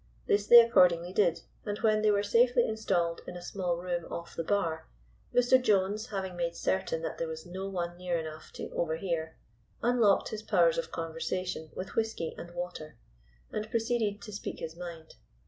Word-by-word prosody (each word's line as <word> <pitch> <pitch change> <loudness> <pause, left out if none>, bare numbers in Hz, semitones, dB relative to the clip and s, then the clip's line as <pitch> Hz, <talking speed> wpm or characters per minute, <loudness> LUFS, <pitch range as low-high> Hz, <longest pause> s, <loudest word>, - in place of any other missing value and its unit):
This 205 0 +1
they 240 - +11
accordingly 180 -6 +4
did, 170 -5 +2 0.2
and 205 -1 -3
when 215 -1 +3
they 215 - +4
were 205 -1 +3
safely 240 +3 +4
installed 185 -6 0
in 180 - -6
a - - -8
small 175 -2 -2
room 175 -1 -4
off 170 0 -6
the 165 - -2
bar, 170 -4 -1 0.4
Mr. 245 +1 +4
Jones, 210 0 +1
having 190 -4 -4
made 170 -1 -2
certain 185 -4 -1
that - - -4
there 165 - -1
was 160 0 -7
no 190 +2 -5
one 175 -2 -3
near 180 -1 -1
enough 155 -1 -7
to - - -6
overhear, 160 -1 -2 0.5
unlocked 235 -4 +3
his 215 - -5
powers - - +3
of - - -5
conversation 165 +1 -3
with 185 - -6
whisky 220 -7 -1
and 175 - -8
water, 160 -5 -6 0.5
and 215 0 -4
proceeded 225 -3 0
to 210 - -8
speak 205 - -5
his 160 0 -6
mind. 170 -2 -9
185 Hz, 180 wpm, -30 LUFS, 170-215 Hz, 0.5 s, they